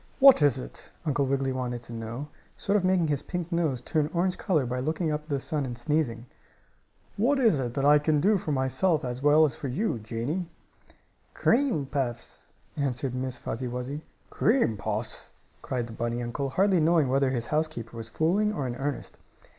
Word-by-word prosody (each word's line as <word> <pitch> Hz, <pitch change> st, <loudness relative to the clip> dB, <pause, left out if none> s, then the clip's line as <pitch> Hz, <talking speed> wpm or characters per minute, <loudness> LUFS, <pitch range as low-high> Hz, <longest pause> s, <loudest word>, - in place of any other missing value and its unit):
"What 275 Hz, -, +8 dB
is 145 Hz, -4 st, +4 dB
it?" -, -, -8 dB, 0.2 s
Uncle 140 Hz, -2 st, +1 dB
Wiggily 135 Hz, 0 st, 0 dB
wanted 125 Hz, -2 st, -3 dB
to 120 Hz, -, -10 dB
know, 115 Hz, +5 st, -5 dB, 0.3 s
sort 200 Hz, -, 0 dB
of 205 Hz, -, +3 dB
making 185 Hz, -3 st, +3 dB
his 145 Hz, -2 st, 0 dB
pink 175 Hz, -1 st, -5 dB
nose 160 Hz, -8 st, 0 dB
turn 150 Hz, +3 st, 0 dB
orange 180 Hz, +2 st, +1 dB
color 155 Hz, -8 st, +1 dB
by 125 Hz, +1 st, -2 dB
looking 155 Hz, +4 st, -1 dB
up 150 Hz, 0 st, -1 dB
at 155 Hz, -, -24 dB
the 140 Hz, -2 st, 0 dB
sun 150 Hz, +1 st, -2 dB
and 125 Hz, -3 st, -5 dB
sneezing. 120 Hz, -3 st, -1 dB, 0.9 s
"What 255 Hz, +8 st, +3 dB
is 225 Hz, -, +4 dB
it 120 Hz, -2 st, -3 dB
that 135 Hz, -, 0 dB
I 150 Hz, +1 st, +7 dB
can 150 Hz, 0 st, +2 dB
do 200 Hz, +5 st, +3 dB
for 155 Hz, -, -3 dB
myself 140 Hz, +4 st, +1 dB
as 125 Hz, +1 st, -4 dB
well 150 Hz, +2 st, +6 dB
as 135 Hz, -6 st, -1 dB
for 140 Hz, -, -5 dB
you, 130 Hz, -, -1 dB
Janie?" 120 Hz, -, -3 dB, 0.9 s
"Cream 235 Hz, -, +2 dB
puffs," 130 Hz, -4 st, -4 dB, 0.3 s
answered 135 Hz, -2 st, -1 dB
Miss 130 Hz, 0 st, -3 dB
Fuzzy 125 Hz, +2 st, -4 dB
Wuzzy. 125 Hz, +4 st, -4 dB, 0.3 s
"Cream 220 Hz, -, +2 dB
puffs?" 110 Hz, +2 st, -4 dB, 0.3 s
cried 125 Hz, -2 st, -2 dB
the 115 Hz, -, -9 dB
bunny 120 Hz, +1 st, -2 dB
uncle, 135 Hz, +4 st, -3 dB
hardly 190 Hz, +5 st, +3 dB
knowing 160 Hz, -2 st, +4 dB
whether 135 Hz, +1 st, +2 dB
his 120 Hz, -3 st, -1 dB
housekeeper 150 Hz, -7 st, -2 dB
was 115 Hz, -1 st, -6 dB
fooling 185 Hz, -, +1 dB
or 145 Hz, -10 st, -3 dB
in 120 Hz, -1 st, -3 dB
earnest. 140 Hz, +1 st, -4 dB
140 Hz, 190 wpm, -27 LUFS, 125-160 Hz, 0.9 s, What